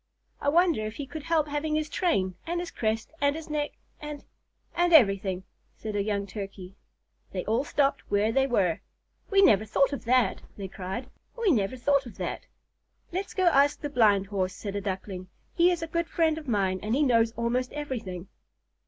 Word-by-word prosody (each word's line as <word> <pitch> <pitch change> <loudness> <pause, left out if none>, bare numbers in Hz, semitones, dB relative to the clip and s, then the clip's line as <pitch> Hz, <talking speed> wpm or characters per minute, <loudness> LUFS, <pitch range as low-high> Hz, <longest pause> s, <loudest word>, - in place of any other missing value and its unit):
"I 285 - +2
wonder 335 -6 +3
if 215 - -7
he 285 - -5
could 310 +3 -7
help 320 -1 +1
having 295 +1 -1
his 310 0 0
train, 300 - 0
and 345 +1 -1
his 350 -1 -5
crest, 220 0 -2
and 285 0 +3
his 320 -1 -7
neck, 295 -1 -1 0.3
and 295 -1 -7 0.5
and 350 0 +2
everything?" 195 - +4 0.3
said 215 -1 -5
a 205 - +1
young 200 -1 -1
Turkey. 195 -1 -8 0.6
They 185 - -3
all 225 +5 +1
stopped 285 -1 0
where 205 +2 +2
they 270 +3 +2
were. 190 -10 +1 0.5
"We 395 -1 +5
never 215 - +6
thought 270 +7 +2
of 280 - -5
that!" 240 -4 +2 0.2
they 195 -2 -5
cried. 190 +7 -6 0.3
"We 455 -5 +3
never 225 -1 +1
thought 280 +1 +2
of 235 - -12
that!" - - -4 0.6
"Let's 375 +3 -4
go 375 - +1
and 345 - +5
ask 280 +1 +4
the 290 - -4
Blind 210 -7 +4
Horse," 190 -2 -2
said 200 -2 -6
a 200 - -1
Duckling. 190 -1 -5 0.3
"He 345 +1 +5
is 345 -2 -1
a - - -3
good 335 +1 -1
friend 320 -2 +1
of 305 - -13
mine, 195 -5 +1
and 215 +3 0
he 295 - +3
knows 230 -4 +3
almost 245 +2 -1
everything." 230 - -5
250 Hz, 195 wpm, -28 LUFS, 200-300 Hz, 0.6 s, never